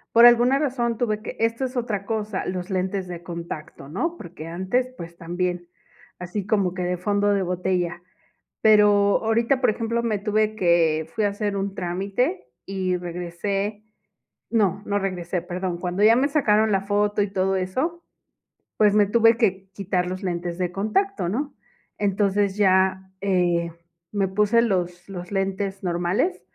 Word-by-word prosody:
por 235 - +9
alguna 240 +3 +6
razón 245 -5 0
tuve 215 -3 -1
que - - -7
esto 230 +3 0
es 255 0 -3
otra 210 -5 -2
cosa, 215 -3 -2
los 180 0 -4
lentes 190 0 -1
de 175 -1 -7
contacto, 170 -5 -7
¿no? 330 - -2
Porque 165 -2 -9
antes, 190 +10 -1
pues, 170 -2 -8
también, 175 0 -3 0.5
así 180 +2 -4
como 200 -4 +1
que 185 - -4
de 180 0 -1
fondo 205 +3 +1
de 200 - +2
botella. 180 -1 -1 0.6
Pero 205 -2 +5
ahorita, 230 +4 +1
por 250 - +4
ejemplo, 230 +2 -1
me 215 -3 0
tuve 215 +1 0
que 165 -4 +2
fui 215 - 0
a - - +4
hacer 205 0 -2
un 195 0 -2
trámite 190 - -1 0.2
y 185 -2 -1
regresé 180 +4 -3 0.7
no 205 -4 +1
no 205 0 0
regresé, 180 -2 -2
perdón. 180 0 -4
Cuando 180 +3 -2
ya 225 +2 +7
me 270 +3 +3
sacaron 220 -7 +3
la 195 -1 +2
foto 205 +1 +1
y 200 - 0
todo 190 0 +1
eso, 265 - -2 0.7
pues, 210 -1 +4
me 210 -1 +5
tuve 230 +2 +4
que 190 -2 0
quitar 185 -2 -1
los 185 +2 -5
lentes 175 -2 -3
de 180 -1 -1
contacto, 215 - 0
¿no? 270 +10 -2 0.5
Entonces 200 0 +1
ya, 190 -1 +2
eh, 175 -3 +1 0.4
me 195 -2 +1
puse 210 +4 +3
los 180 -4 -1
los 180 -1 -7
lentes 195 0 -2
normales 175 - 0
195 Hz, 160 wpm, -24 LUFS, 180-215 Hz, 0.7 s, por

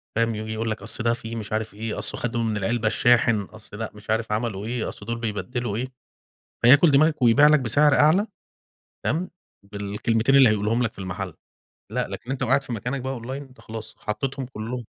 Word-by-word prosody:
فاهم؟ 115 +1 +2
وييجي 110 0 -4
يقول 110 0 -2
لك 110 - -4
أصل 115 +1 -4
ده 115 0 +3
فيه 115 -1 -6
مش 110 -2 -6
عارف 110 0 -2
إيه، 110 +2 -4
أصله - - -2
خَدوا 120 -1 -1
من 110 -2 -1
العلبة 115 +3 0
الشاحن، 115 -1 +3
أصل 105 +1 -11
لأ 110 - -4
مش 105 0 -15
عارف 110 0 0
عملوا 105 -2 -2
إيه، 120 0 -2
أصل 105 - -10
دول 115 +1 -3
بيبدِّلوا 115 0 -3
إيه، 125 +4 -2 0.7
فياكل 145 +7 +7
دماغك 150 +2 +3
ويبيع 125 +5 +6
لك 150 0 +5
بسِعر 140 +4 +3
أعلى، 160 +8 +4 0.8
تمام، 170 +6 -1 0.4
بالكلمتين 110 +5 0
اللي 135 -4 +8
هيقولهم 110 +3 +1
لك 115 - -1
في - - -14
المحل، 95 -1 -5 0.6
لأ - - -1
لكن 125 - -7
أنت 135 - -3
لو 125 - 0
قاعد 135 +3 +3
في 125 - -6
مكانك 125 +5 -3
بقى 130 0 -4
online 115 - -9 0.2
أنت 130 - -19
خلاص 110 0 -8
حطيتهم 135 +5 -3
كلّهم. 120 0 -6
115 Hz, 205 wpm, -24 LUFS, 110-125 Hz, 0.8 s, اللي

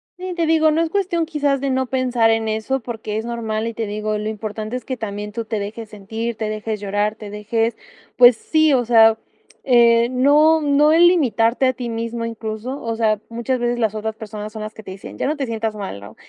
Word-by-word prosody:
Sí, 365 0 -6
te 335 -2 0
digo, 315 -1 +4
no 320 +2 +1
es 330 - 0
cuestión 345 -3 0
quizás 285 -4 0
de 275 - -1
no 260 0 0
pensar 250 -3 +1
en 225 0 0
eso 220 +5 -1
porque, 225 -3 -5
es 220 - -3
normal 225 -2 -3
y 230 - -5
te 225 - -2
digo, 210 +1 -2
lo 210 +1 -3
importante 215 +1 -5
es 250 - -5
que 260 -2 -5
también 210 -1 -5
tú 230 +1 -5
te 220 -1 -3
dejes 215 +2 -6
sentir, 220 +2 -5
te 215 -1 -3
dejes 215 0 -4
llorar, 205 +1 -1
te 210 -1 -9
dejes, 225 +3 -1 0.4
pues 245 -1 +7
sí, 315 +3 +2
o 245 -2 +3
sea, 225 -1 +5 0.4
eh, 235 -2 +5
no 295 +5 +4
no 295 +1 +4
es 325 +2 +5
limitarte 260 - +3
a 255 - +2
ti 245 -1 -5
mismo, 230 0 -3
incluso, 230 +3 -5
o 230 -1 -3
sea, 215 -2 +1
muchas 235 +2 -2
veces 240 0 0
las 220 -3 0
otras 220 0 -4
personas 215 -1 -7
son 220 - -7
las 215 0 -7
que 220 - -11
te 190 - -9
dicen: 190 +1 -10
"Ya - - 0
no 300 - 0
te 275 - -2
sientas 225 -2 -3
mal", 195 - -6
¿no?, 100 +2 -12
230 Hz, 230 wpm, -20 LUFS, 215-260 Hz, 0.4 s, pues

